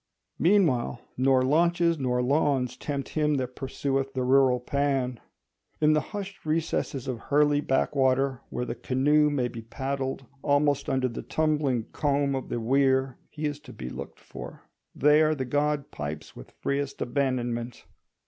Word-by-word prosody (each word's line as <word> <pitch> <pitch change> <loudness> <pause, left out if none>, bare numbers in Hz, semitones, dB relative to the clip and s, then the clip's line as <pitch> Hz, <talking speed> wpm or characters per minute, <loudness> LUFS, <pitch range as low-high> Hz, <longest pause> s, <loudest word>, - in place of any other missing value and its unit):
Meanwhile, 160 - +3 0.2
nor 130 0 +3
launches 170 +3 +2
nor 125 -2 0
lawns 135 -2 +1
tempt 140 -1 -4
him 150 -1 +1
that 130 -2 -3
pursueth 135 0 -2
the 130 - 0
rural 130 -1 +4
Pan. 135 -2 -1 0.6
In 155 0 +4
the 155 - +3
hushed 200 +4 -7
recesses 155 -4 -1
of 125 -3 -3
Hurley 145 +1 +2
backwater 135 -1 +1
where 125 - -3
the 115 - -3
canoe 150 +5 +2
may 135 -4 0
be 115 -1 -7
paddled 135 +3 -4 0.2
almost 145 -1 +2
under 130 -1 +1
the 115 - -5
tumbling 150 -6 0
comb 140 -1 +1
of 135 -1 -4
the 120 - -2
weir, 130 +1 +2
he 155 0 -5
is 145 -1 -2
to 140 -4 -13
be 60 - -7
looked - - -8
for; - - -10 0.3
there 155 +2 +4
the 130 -2 -3
god 145 +2 0
pipes 75 +1 -6
with - - -11
freest 140 0 -3
abandonment. 120 -2 -2
135 Hz, 150 wpm, -27 LUFS, 130-150 Hz, 0.6 s, rural